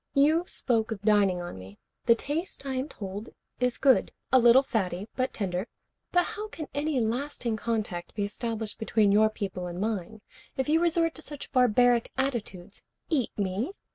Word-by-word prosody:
You 310 +5 +4
spoke 225 -3 0
of 205 -2 -5
dining 200 -4 +3
on 175 - -7
me. 95 +2 -12 0.3
The 230 - +7
taste, 295 +4 -4
I 270 - -2
am 260 +3 -2
told, 205 -1 -7 0.3
is 250 -1 +1
good. 265 -2 +4 0.2
A 260 - +7
little 240 +2 +7
fatty, 200 -6 -2
but 255 0 0
tender. 190 0 -2 0.4
But 355 0 +4
how 425 0 -5
can 325 -7 -7
any 290 -1 0
lasting 240 0 -1
contact 215 -6 -3
be 205 - -1
established 220 +1 -4
between 215 -2 +3
your 215 +2 +5
people 190 -4 -4
and 175 0 -6
mine 215 0 -3 0.4
if 265 - 0
you 320 +2 +3
resort 335 -1 +2
to 315 - -10
such 295 -2 -7
barbaric 245 -1 +4
attitudes? 215 -8 -3 0.3
Eat 275 -7 +2
me? 205 - -1
230 Hz, 170 wpm, -28 LUFS, 205-275 Hz, 0.4 s, The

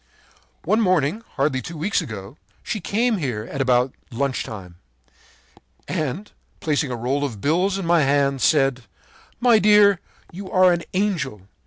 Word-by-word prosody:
“One 220 +2 +2
morning, 185 -1 +1
hardly 135 -2 0
two 165 +4 -8
weeks 185 +6 0
ago, 105 +1 -8 0.3
she 215 - -3
came 225 +5 0
here 125 - -3
at 140 - -3
about 125 0 +2 0.2
lunch 130 +2 -2
time, 90 -5 -9 1.1
and, 170 +4 -3 0.3
placing 150 -2 0
a 125 - -3
roll 130 +5 -1
of 120 -8 -4
bills 180 - +1
in 195 - -4
my 170 -1 +4
hand, 140 -1 +1
said: 135 -5 +2 0.5
'My 240 -2 +5
dear, 205 -2 +5 0.3
you 190 +2 -8
are 185 -1 +5
an 170 - -2
angel! 165 - -1
150 Hz, 150 wpm, -22 LUFS, 130-190 Hz, 1.1 s, My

